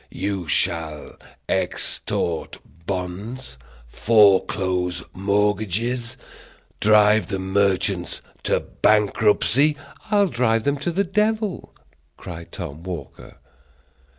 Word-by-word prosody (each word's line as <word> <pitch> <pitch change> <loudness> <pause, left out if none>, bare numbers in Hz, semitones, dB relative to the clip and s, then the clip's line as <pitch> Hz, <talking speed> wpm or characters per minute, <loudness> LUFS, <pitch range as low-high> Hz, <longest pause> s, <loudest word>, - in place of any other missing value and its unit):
"You 95 -4 -3
shall 80 -1 -1 0.4
extort 85 -2 -1 0.3
bonds, 95 - -5 0.3
foreclose 95 - +2
mortgages, 105 +5 0 0.6
drive 105 0 +4
the 100 - -2
merchants 95 -1 0 0.3
to - - +1
bankruptcy 110 +7 +2 0.2
" - - -24
"I'll 205 -2 +4
drive 115 -3 +1
them 140 +3 0
to 175 +5 -2
the 195 +4 +1
devil," 210 +1 -1 0.4
cried 85 -1 -9
Tom 70 +3 -7
Walker. 85 -6 -8
105 Hz, 90 wpm, -22 LUFS, 90-120 Hz, 0.6 s, drive